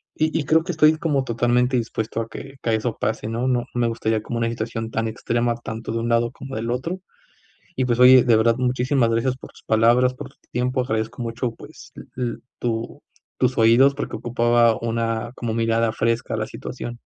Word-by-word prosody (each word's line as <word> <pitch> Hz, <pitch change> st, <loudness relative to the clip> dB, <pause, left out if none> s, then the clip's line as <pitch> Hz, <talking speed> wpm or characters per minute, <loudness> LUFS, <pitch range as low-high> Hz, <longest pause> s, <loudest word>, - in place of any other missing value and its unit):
Y 155 Hz, 0 st, 0 dB
y 145 Hz, -, -3 dB
creo 160 Hz, +4 st, +3 dB
que 180 Hz, -, -3 dB
estoy 155 Hz, 0 st, +4 dB
como 150 Hz, -4 st, 0 dB
totalmente 125 Hz, +1 st, +1 dB
dispuesto 115 Hz, -1 st, -3 dB
a 115 Hz, -, -5 dB
que 135 Hz, +4 st, -9 dB
que 115 Hz, -1 st, +1 dB
eso 110 Hz, +1 st, -2 dB
pase, 110 Hz, -1 st, -2 dB
¿no?, 115 Hz, +3 st, -1 dB
no 125 Hz, -1 st, +2 dB
no 120 Hz, -, -2 dB
me 120 Hz, -, +3 dB
gustaría 110 Hz, -1 st, -1 dB
como 120 Hz, +1 st, -4 dB
una 115 Hz, 0 st, 0 dB
situación 115 Hz, 0 st, -4 dB
tan 115 Hz, 0 st, -1 dB
extrema 120 Hz, +2 st, -1 dB
tanto 115 Hz, -1 st, -6 dB
de 115 Hz, -, -1 dB
un 115 Hz, +1 st, -2 dB
lado 115 Hz, 0 st, +2 dB
como 135 Hz, +1 st, -9 dB
del 115 Hz, +2 st, -2 dB
otro 165 Hz, +10 st, -3 dB, 0.8 s
y 130 Hz, -, +2 dB
pues 120 Hz, 0 st, 0 dB
oye, 130 Hz, 0 st, +8 dB
de 120 Hz, -3 st, +4 dB
verdad, 115 Hz, +1 st, +3 dB
muchísimas 125 Hz, 0 st, +1 dB
gracias 115 Hz, +3 st, 0 dB
por -, -, -12 dB
tus -, -, -18 dB
palabras, 120 Hz, +3 st, +3 dB
por 135 Hz, +1 st, -9 dB
tu -, -, -27 dB, 0.2 s
tiempo. 125 Hz, +1 st, 0 dB
Agradezco 110 Hz, +1 st, -3 dB
mucho, 120 Hz, +1 st, -3 dB
pues -, -, -14 dB
l -, -, -8 dB
l 120 Hz, -2 st, -2 dB, 0.2 s
tu 115 Hz, -1 st, -3 dB, 0.4 s
tus 125 Hz, 0 st, +1 dB
oídos 120 Hz, +5 st, +5 dB
porque 145 Hz, -, -4 dB
ocupaba 120 Hz, -1 st, +2 dB
una 115 Hz, 0 st, -2 dB
como 115 Hz, -2 st, -3 dB
mirada 115 Hz, 0 st, +1 dB
fresca 115 Hz, +2 st, -1 dB
a -, -, -1 dB
la 110 Hz, -, -2 dB
situación. 120 Hz, 0 st, -7 dB
120 Hz, 210 wpm, -22 LUFS, 115-125 Hz, 0.8 s, oye